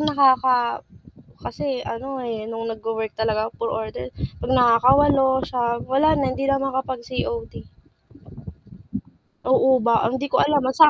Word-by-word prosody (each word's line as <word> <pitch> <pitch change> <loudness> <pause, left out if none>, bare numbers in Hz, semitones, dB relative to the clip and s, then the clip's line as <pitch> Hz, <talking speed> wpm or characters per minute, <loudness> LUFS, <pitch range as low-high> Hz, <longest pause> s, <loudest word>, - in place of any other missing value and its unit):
nakaka 260 -5 +3 0.6
kasi 270 -3 -4
ano, 260 +2 -6
eh, 225 -2 -5
nung 225 0 -5
nag-wo-work 220 0 -4
talaga 220 0 0
puro 230 - -2
order, 125 - -8 0.2
'pag 260 - -3
nakakawalo, 265 +3 +4
9, 235 -2 -2
wala 305 +4 +4
na, 275 -3 0
hindi 275 +1 -3
na 275 0 +1
makakapag-COD. 265 - -4 1.8
Oo 260 0 +4
ba 235 -1 +2
ang 260 - -2
'di 280 - -3
ko - - +2
alam, 295 0 +3
ah, 260 - 0
sa 310 +1 +8
255 Hz, 140 wpm, -22 LUFS, 230-275 Hz, 1.8 s, sa